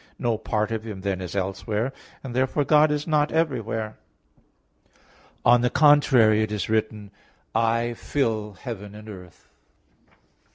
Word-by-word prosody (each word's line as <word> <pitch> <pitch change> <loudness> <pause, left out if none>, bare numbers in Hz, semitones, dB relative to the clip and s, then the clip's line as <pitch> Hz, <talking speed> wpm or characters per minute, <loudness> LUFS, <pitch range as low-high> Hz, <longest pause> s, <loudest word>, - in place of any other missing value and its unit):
No 120 -3 0
part 105 0 -2
of 110 -1 -2
Him 105 -4 -7
then 95 -1 -2
is 90 +1 -6
elsewhere; 105 +6 -2 0.3
and 125 -3 -7
therefore 130 +3 +1
God 150 +2 +4
is 150 0 -1
not 150 -2 +1
everywhere. 115 -9 -2 1.5
On 120 0 +6
the 125 - +2
contrary, 130 -8 +5
It 110 -1 -1
is 105 -3 -3
written, 110 -2 -1 0.4
"I 115 +1 +1
fill 110 -5 -2
heaven 105 -1 -8
and 105 +1 -12
earth." 90 -4 -12
110 Hz, 135 wpm, -24 LUFS, 105-130 Hz, 1.5 s, On